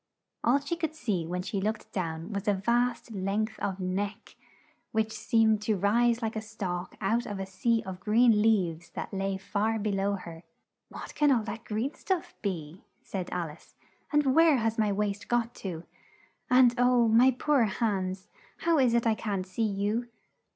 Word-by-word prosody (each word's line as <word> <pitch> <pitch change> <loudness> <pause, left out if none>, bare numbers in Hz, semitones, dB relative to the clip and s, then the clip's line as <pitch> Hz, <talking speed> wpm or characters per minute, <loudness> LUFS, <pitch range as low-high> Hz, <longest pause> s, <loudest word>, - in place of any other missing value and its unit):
All 245 +4 +4
she 285 +4 -3
could 320 -2 -3
see 200 - -2
when 180 +1 -3
she 195 0 -3
looked 215 +2 -3
down 165 +1 -4
was 200 +2 -4
a 205 - +3
vast 240 +4 0
length 210 +2 -2
of 195 -1 -2
neck, 195 +3 -3 0.6
which 220 0 0
seemed 220 -1 +2
to 210 -1 0
rise 230 +5 +2
like 225 0 -2
a 220 - -2
stalk 195 -5 -5
out 225 +4 0
of 205 - -4
a 195 - -3
sea 225 +4 0
of 185 -1 -6
green 220 +1 +4
leaves 180 -7 +1
that - - -5
lay 195 0 -1
far 215 +3 -1
be 215 0 -1
low 195 +1 0
her. 170 -4 -7 0.5
"What - - -9
can 295 -1 +3
all 235 -4 +3
that 225 +2 -6
green 225 +7 -2
stuff 365 -2 -3
be?" 170 -4 -4 0.2
said 185 -2 -5
Al 170 -3 -3
ice. 150 - -18 0.4
"And 295 -3 +3
where 325 -1 +6
has 225 -1 -1
my 215 -1 +2
waist 205 0 -2
got 240 -1 0
to? 170 -4 -5 0.7
And 250 -1 +6
oh, 245 -1 +4
my 235 +4 +6
poor 265 0 +2
hands, 190 -3 -2 0.3
how 335 -2 +3
is 245 -3 +4
it 235 - +2
I 225 - +4
can't 200 -4 -3
see 185 +4 -5
you?" 210 +3 0
215 Hz, 185 wpm, -29 LUFS, 195-235 Hz, 0.7 s, where